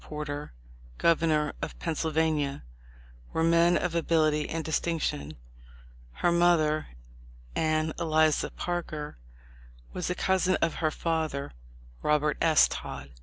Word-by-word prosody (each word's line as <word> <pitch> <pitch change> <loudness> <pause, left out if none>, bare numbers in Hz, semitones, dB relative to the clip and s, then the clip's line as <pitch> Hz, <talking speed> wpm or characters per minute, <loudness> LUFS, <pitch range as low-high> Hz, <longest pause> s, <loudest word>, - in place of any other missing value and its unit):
Porter, 150 -1 -5 0.5
governor 160 -3 +2
of - - -5
Pennsyl 160 -1 -2
vania, 155 -3 0 0.7
were 160 - +1
men 170 +1 +4
of 180 - -2
ability 155 -2 +1
and 160 -1 -3
distinction. 150 - -2 0.8
Her 175 - +1
mother, 170 -3 +3 0.7
Anne 155 0 +1
Eliza 155 -2 +2
Parker, 155 - -4 0.7
was 180 - -3
a 180 - -1
cousin 190 0 +2
of 165 - 0
her 155 - +3
father, 155 -3 -2 0.5
Robert 150 0 +2
S. 160 -2 +5
Todd. 70 +1 -7
160 Hz, 115 wpm, -28 LUFS, 150-170 Hz, 0.8 s, S